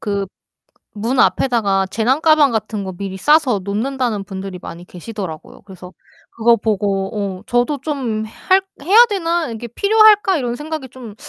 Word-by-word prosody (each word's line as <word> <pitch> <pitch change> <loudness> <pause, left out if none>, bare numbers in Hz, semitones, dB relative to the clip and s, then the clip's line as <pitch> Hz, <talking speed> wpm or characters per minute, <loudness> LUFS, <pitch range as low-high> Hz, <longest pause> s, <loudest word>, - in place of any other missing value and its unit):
그 200 -2 -2 0.7
문 235 +5 -2
앞에다가 200 -9 +2
재난 240 +9 0
가방 310 -4 +4
같은 215 -2 -3
거 190 - -5
미리 190 +1 -6
싸서 290 -6 +3
놓는다는 225 +1 -2
분들이 190 -2 -7
많이 175 +1 -9
계시더라고요. 180 -4 -8
그래서 185 -2 -12 0.4
그거 235 +1 +3
보고 200 -2 -2
어 - - -16
저도 245 +4 0
좀 255 -8 -3
'할 375 - +1 0.2
해야 420 +9 +7
되나? 340 -6 -1
이게 230 +1 -7
필요할까?' 415 - +4
이런 245 -4 -2
생각이 300 -1 -6
좀 235 -4 -11
230 Hz, 320 characters per minute, -18 LUFS, 200-290 Hz, 0.7 s, 해야